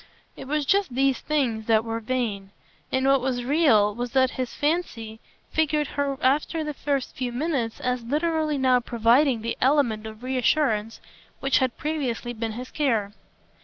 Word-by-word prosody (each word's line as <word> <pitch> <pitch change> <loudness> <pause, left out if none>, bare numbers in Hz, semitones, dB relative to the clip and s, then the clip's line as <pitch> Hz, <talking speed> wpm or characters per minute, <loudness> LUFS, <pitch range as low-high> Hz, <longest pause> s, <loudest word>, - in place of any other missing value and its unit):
It - - -9
was 300 +1 0
just 390 -5 +1
these 270 0 +2
things 245 -8 -1
that 225 -1 +3
were 225 0 -3
vain; 220 -5 -2 0.4
and 260 0 +1
what 270 -1 +4
was 250 -1 -1
real 250 -7 +3
was 240 +2 -5
that 260 -1 +3
his 255 -2 -4
fancy 290 -9 -2 0.3
figured 300 -2 +1
her 280 -1 -2
after 300 +5 +1
the 300 -1 -4
first 280 -2 -2
few 255 -2 -3
minutes 250 -3 -2
as 250 0 -1
literally 310 +3 0
now 260 -2 +3
providing 235 +1 +2
the 230 - -3
element 250 -6 +2
of 220 +2 -11
reassurance 250 -4 0 0.4
which 270 0 +2
had 260 -2 -1
previously 260 -6 -3
been 225 -1 -4
his 250 +3 -7
care. 225 -9 0
255 Hz, 165 wpm, -25 LUFS, 230-290 Hz, 0.4 s, what